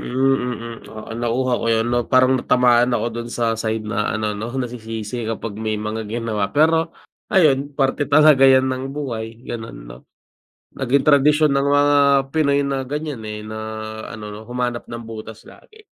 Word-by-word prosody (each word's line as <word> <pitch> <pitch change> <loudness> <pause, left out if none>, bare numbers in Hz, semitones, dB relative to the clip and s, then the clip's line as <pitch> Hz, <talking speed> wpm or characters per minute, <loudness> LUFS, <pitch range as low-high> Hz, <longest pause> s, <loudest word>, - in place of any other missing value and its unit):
mm. 125 -3 -1
Oo, 110 0 -10
nakuha 120 +2 0
ko - - -3
'yun 115 0 +2
'no 120 - +2
parang 130 0 +4
natamaan 125 -1 +3
ako - - -2
do'n 120 - -7
sa 115 -1 0
side 110 0 -2
na 105 0 -1
ano 110 -1 -1
'no, 105 +3 -5
nasisisi 115 -2 -5
kapag 115 -1 -4
may 110 -1 -1
mga 110 +1 -4
ginawa. 110 -3 -2
Pero 160 +2 +3 0.4
ayun, 145 -6 +3
parte 135 +1 +1
talaga 145 -2 +6
yan 130 0 +5
ng 130 0 -3
buhay 115 -4 -5
gano'n 115 -1 -6
'no. - - -10 0.8
Naging 135 +1 +1
tradisyon 150 +1 +4
ng 140 +1 +1
mga 145 0 +4 0.4
Pinoy 140 -2 +3
na 135 -1 -2
ganyan, 145 -1 -5
eh, 105 0 -6
na 110 0 -7 0.5
ano 105 -1 -8
'no 105 - -9
humanap 120 -1 -3
ng 115 0 -6
butas 110 -1 -9
lagi. 435 0 -17
120 Hz, 165 wpm, -20 LUFS, 110-140 Hz, 0.8 s, talaga